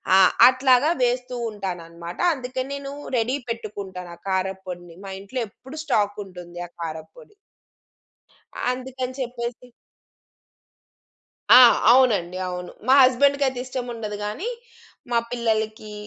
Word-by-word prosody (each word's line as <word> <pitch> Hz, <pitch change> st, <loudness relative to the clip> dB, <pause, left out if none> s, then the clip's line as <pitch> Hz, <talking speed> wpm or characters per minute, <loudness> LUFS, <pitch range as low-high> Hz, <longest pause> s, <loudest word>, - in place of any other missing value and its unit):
ఆ! -, -, +7 dB, 0.3 s
అట్లాగా 255 Hz, +3 st, +4 dB
వేస్తూ 250 Hz, 0 st, 0 dB
ఉంటానన్నమాట. 175 Hz, -4 st, -7 dB
అందుకే 260 Hz, -2 st, -4 dB
నేను 280 Hz, 0 st, -6 dB, 0.3 s
రెడీ 240 Hz, +4 st, +1 dB
పెట్టుకుంటాను 200 Hz, -5 st, -6 dB
ఆ -, -, -23 dB
కారప్పొడిని. 185 Hz, -2 st, -4 dB
మా 195 Hz, -, -6 dB
ఇంట్లో 225 Hz, +6 st, -5 dB
ఎప్పుడు 265 Hz, +7 st, -12 dB
స్టాక్ 205 Hz, -8 st, 0 dB
ఉంటుంది 175 Hz, -2 st, -11 dB
ఆ -, -, -25 dB
కారప్పొడి. 160 Hz, -, -8 dB, 1.4 s
అందుకని 255 Hz, 0 st, -5 dB
చెప్పేసి 245 Hz, -1 st, -5 dB, 1.8 s
ఆ! -, -, +10 dB, 0.3 s
అవునండి. 210 Hz, -9 st, +3 dB
అవును. 180 Hz, 0 st, -5 dB, 0.2 s
మా 265 Hz, -, +6 dB
హస్బెండ్‌కయితే 265 Hz, 0 st, +3 dB
ఇష్టముండదు 235 Hz, -5 st, -5 dB
కానీ, 270 Hz, -, -3 dB, 0.6 s
మా 235 Hz, -, +3 dB
పిల్లలకి, 220 Hz, -2 st, -2 dB
230 Hz, 105 wpm, -23 LUFS, 190-255 Hz, 1.8 s, ఆ